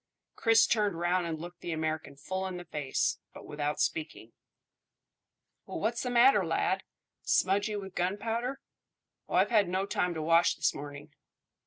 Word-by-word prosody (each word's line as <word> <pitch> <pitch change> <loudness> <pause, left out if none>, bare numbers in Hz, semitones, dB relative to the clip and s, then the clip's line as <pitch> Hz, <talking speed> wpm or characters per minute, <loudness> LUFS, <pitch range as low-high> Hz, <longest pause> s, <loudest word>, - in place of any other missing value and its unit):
Chris 225 0 +5
turned 210 -7 +1
round 175 0 +1
and 160 -2 -4
looked 175 +1 -9
the 175 - -4
American 155 -2 -3
full 185 +7 -4
in 185 -1 -5
the 175 - -8
face, 150 -4 -1 0.2
but - - -10
without 150 0 -3
speaking. 155 -8 -2 1.3
"Well, - - -5
what's 235 +2 -1
the 250 - -2
matter, 245 +2 +5
lad? - - 0 0.4
Smudgy 200 +3 +1
with 195 -2 -6
gunpowder? 225 +9 -2 0.7
Oh, - - -2
I've - - +3
had 210 -5 +4
no 190 +2 0
time 180 -3 -1
to 160 - -3
wash 165 +2 +4
this - - +1
morning." 145 +1 -9
180 Hz, 160 wpm, -30 LUFS, 160-210 Hz, 1.3 s, Chris